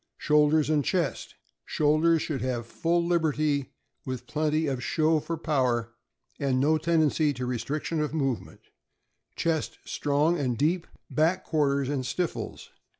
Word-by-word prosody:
Shoulders 150 Hz, 0 st, +3 dB
and 150 Hz, -2 st, +2 dB
chest. 175 Hz, -5 st, -1 dB
— 60 Hz, 0 st, -44 dB
Shoulders 155 Hz, +2 st, +3 dB
should 150 Hz, -5 st, -3 dB
have 125 Hz, -2 st, -2 dB
full 170 Hz, +8 st, 0 dB
lib 170 Hz, -1 st, +2 dB
erty, 150 Hz, -3 st, 0 dB, 0.4 s
with 130 Hz, -2 st, -5 dB
plenty 155 Hz, 0 st, 0 dB
of 130 Hz, -4 st, -2 dB
show 160 Hz, +1 st, +2 dB
for 165 Hz, +2 st, -4 dB
power 125 Hz, -7 st, 0 dB, 0.5 s
and 135 Hz, -2 st, +1 dB
no 155 Hz, +3 st, +3 dB
tendency 155 Hz, -2 st, +2 dB
to 125 Hz, -1 st, -4 dB
restriction 145 Hz, +6 st, -2 dB
of 150 Hz, -, -1 dB
movement; 135 Hz, -6 st, -2 dB, 0.7 s
chest 160 Hz, -3 st, -1 dB
strong 150 Hz, +4 st, +1 dB
and 125 Hz, -4 st, -1 dB
deep. 165 Hz, +5 st, +1 dB, 0.2 s
Back 165 Hz, +4 st, +2 dB
quarters 140 Hz, -3 st, +1 dB
and 140 Hz, -2 st, -1 dB
stifles. 170 Hz, +6 st, -4 dB
150 Hz, 145 wpm, -27 LUFS, 135-160 Hz, 0.7 s, Shoulders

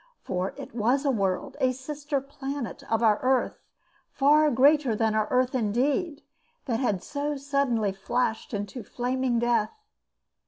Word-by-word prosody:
For 180 Hz, +1 st, -3 dB
it -, -, -9 dB
was 245 Hz, +5 st, +1 dB
a 275 Hz, -, +3 dB
world, 195 Hz, -6 st, -1 dB
a 255 Hz, -, +3 dB
sister 285 Hz, +2 st, -3 dB
planet 275 Hz, -1 st, -6 dB
of 225 Hz, +1 st, +2 dB
our 215 Hz, -2 st, +4 dB
earth, 260 Hz, 0 st, +1 dB, 0.5 s
far 300 Hz, +2 st, +4 dB
greater 275 Hz, -1 st, +4 dB
than 220 Hz, 0 st, +1 dB
our 215 Hz, -1 st, +1 dB
earth 255 Hz, +1 st, +2 dB
indeed, 275 Hz, -, 0 dB, 0.4 s
that 230 Hz, -4 st, -1 dB
had 205 Hz, -8 st, 0 dB
so 290 Hz, 0 st, -3 dB
suddenly 270 Hz, -7 st, 0 dB
flashed 220 Hz, +4 st, -2 dB
into 205 Hz, +3 st, -4 dB
flaming 250 Hz, +2 st, -1 dB
death. 240 Hz, -, +1 dB
255 Hz, 145 wpm, -27 LUFS, 225-280 Hz, 0.5 s, our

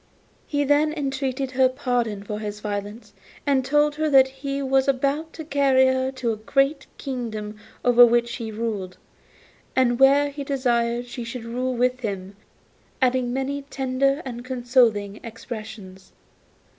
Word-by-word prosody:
He 290 Hz, -1 st, 0 dB
then 295 Hz, +2 st, +3 dB
entreated 270 Hz, -2 st, -2 dB
her 260 Hz, 0 st, +4 dB
pardon 245 Hz, -6 st, -2 dB
for 210 Hz, +1 st, -5 dB
his 210 Hz, -1 st, -5 dB
violence, 205 Hz, +1 st, -5 dB, 0.3 s
and 275 Hz, -2 st, +2 dB
told 295 Hz, +2 st, +2 dB
her 310 Hz, 0 st, +1 dB
that 265 Hz, -2 st, +6 dB
he 275 Hz, +1 st, -4 dB
was 270 Hz, 0 st, +2 dB
about 280 Hz, +4 st, 0 dB
to 320 Hz, -, -8 dB
carry 275 Hz, -3 st, +3 dB
her 260 Hz, 0 st, +1 dB
to 250 Hz, -3 st, -1 dB
a -, -, -6 dB
great 275 Hz, +6 st, 0 dB
kingdom 220 Hz, -5 st, -5 dB, 0.3 s
over 245 Hz, 0 st, +7 dB
which 235 Hz, 0 st, +3 dB
he 225 Hz, -2 st, -5 dB
ruled, 210 Hz, -4 st, -4 dB, 0.8 s
and 245 Hz, -2 st, +2 dB
where 280 Hz, +2 st, +5 dB
he 280 Hz, 0 st, -6 dB
desired 240 Hz, -3 st, 0 dB
she 245 Hz, 0 st, -7 dB
should 230 Hz, 0 st, -7 dB
rule 250 Hz, +2 st, -2 dB
with 250 Hz, +1 st, +1 dB
him, 200 Hz, -4 st, -5 dB, 0.6 s
adding 255 Hz, -2 st, +1 dB
many 270 Hz, +2 st, -2 dB
tender 275 Hz, +1 st, -1 dB
and 240 Hz, -2 st, -6 dB
consoling 240 Hz, -5 st, +1 dB
expressions. 215 Hz, -4 st, -9 dB
255 Hz, 145 wpm, -24 LUFS, 230-275 Hz, 0.8 s, over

